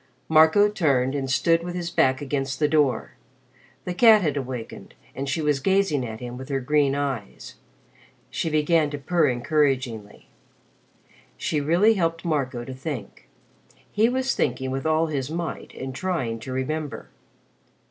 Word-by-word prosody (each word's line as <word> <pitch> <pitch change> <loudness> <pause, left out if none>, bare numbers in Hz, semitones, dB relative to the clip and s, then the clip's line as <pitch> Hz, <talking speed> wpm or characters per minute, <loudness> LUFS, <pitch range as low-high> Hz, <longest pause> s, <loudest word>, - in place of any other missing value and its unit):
Marco 160 +6 +6
turned 140 -10 +1
and 135 -2 -3
stood 165 +5 +2
with 175 +1 -6
his 175 -1 -4
back 130 +2 +2
against 135 -1 -2
the 150 - +2
door. 145 -6 +1 0.7
The 180 - -2
cat 220 0 +6
had 150 -4 0
awakened 125 -4 -6 0.2
and 135 +1 -4
she 155 +3 -1
was 150 -2 +1
gazing 190 -5 +1
at 110 -2 -6
him 125 0 -7
with 130 +2 -9
her 135 -1 0
green 140 +1 +2
eyes. 135 -7 -4 0.8
She 165 - -2
began 155 0 +2
to 145 - -5
purr 165 +2 +1
encouragingly. 125 -4 -1 1.1
She 150 - -1
really 175 +9 +4
helped 165 -4 -1
Marco 135 -7 -1
to 130 - -7
think. 130 -5 -7 0.6
He 220 +3 +3
was 260 +1 0
thinking 130 -1 -1
with 135 +3 -2
all 160 +1 +2
his 140 -4 -3
might 170 +1 -5
and 130 0 -6
trying 130 -9 -2
to 120 +4 -8
remember. 145 +3 -4
145 Hz, 155 wpm, -24 LUFS, 130-165 Hz, 1.1 s, Marco